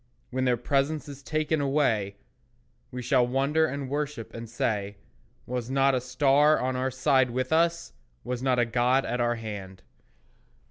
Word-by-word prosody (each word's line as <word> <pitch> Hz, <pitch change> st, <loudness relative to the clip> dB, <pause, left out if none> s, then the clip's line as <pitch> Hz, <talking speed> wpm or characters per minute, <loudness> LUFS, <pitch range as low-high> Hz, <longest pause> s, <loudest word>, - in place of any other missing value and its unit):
When 130 Hz, +1 st, -1 dB
their 125 Hz, -1 st, +2 dB
presence 140 Hz, +5 st, 0 dB
is 140 Hz, -1 st, -9 dB
taken 155 Hz, +1 st, -1 dB
away, 120 Hz, -9 st, +1 dB, 0.7 s
We 125 Hz, -1 st, -6 dB
shall 120 Hz, +1 st, +3 dB
wonder 140 Hz, +5 st, +2 dB
and 140 Hz, -2 st, -4 dB
worship, 145 Hz, -4 st, -4 dB
and 115 Hz, -1 st, -8 dB
say, 105 Hz, -3 st, -2 dB, 0.5 s
"Was 125 Hz, -1 st, -4 dB
not 135 Hz, 0 st, +3 dB
a 130 Hz, -, +1 dB
star 140 Hz, +4 st, +3 dB
on 130 Hz, 0 st, -1 dB
our 130 Hz, +1 st, 0 dB
side 130 Hz, 0 st, +2 dB
with 130 Hz, +3 st, -2 dB
us? 170 Hz, +1 st, +1 dB, 0.3 s
Was 125 Hz, -1 st, -4 dB
not 130 Hz, -1 st, +1 dB
a 120 Hz, -, +3 dB
God 125 Hz, +3 st, +2 dB
at 125 Hz, -, -2 dB
our 120 Hz, 0 st, +1 dB
hand?" 100 Hz, -4 st, -8 dB
130 Hz, 165 wpm, -27 LUFS, 120-140 Hz, 0.7 s, shall